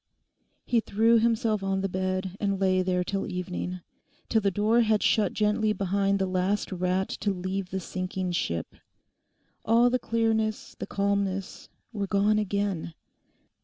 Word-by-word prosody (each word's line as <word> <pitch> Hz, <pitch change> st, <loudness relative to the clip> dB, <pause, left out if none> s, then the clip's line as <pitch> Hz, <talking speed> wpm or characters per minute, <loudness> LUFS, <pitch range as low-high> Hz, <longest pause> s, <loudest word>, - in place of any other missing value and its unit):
He 240 Hz, -, +2 dB
threw 225 Hz, +2 st, +3 dB
himself 225 Hz, -2 st, +1 dB
on 195 Hz, 0 st, -1 dB
the 195 Hz, -, 0 dB
bed 185 Hz, 0 st, -2 dB
and 200 Hz, -2 st, 0 dB
lay 185 Hz, -1 st, +3 dB
there 180 Hz, -1 st, 0 dB
till 195 Hz, +2 st, -2 dB
evening—till 180 Hz, +4 st, -4 dB
the 200 Hz, -, +2 dB
door 215 Hz, +5 st, +3 dB
had 215 Hz, -2 st, +2 dB
shut 215 Hz, -, +3 dB
gently 210 Hz, 0 st, +1 dB
behind 200 Hz, 0 st, +1 dB
the 195 Hz, -, 0 dB
last 185 Hz, +3 st, -1 dB
rat 185 Hz, +1 st, 0 dB
to 205 Hz, -, -1 dB
leave 185 Hz, 0 st, -3 dB
the 190 Hz, -, -3 dB
sinking 185 Hz, 0 st, -3 dB
ship. 85 Hz, -, -2 dB, 0.9 s
All 235 Hz, +2 st, +4 dB
the 255 Hz, -, +1 dB
clearness, 225 Hz, -2 st, -1 dB
the -, -, -4 dB
calmness 200 Hz, -1 st, -2 dB, 0.2 s
were 200 Hz, -2 st, -2 dB
gone 205 Hz, +2 st, +2 dB
again. 200 Hz, -5 st, -2 dB
195 Hz, 145 wpm, -27 LUFS, 185-215 Hz, 0.9 s, All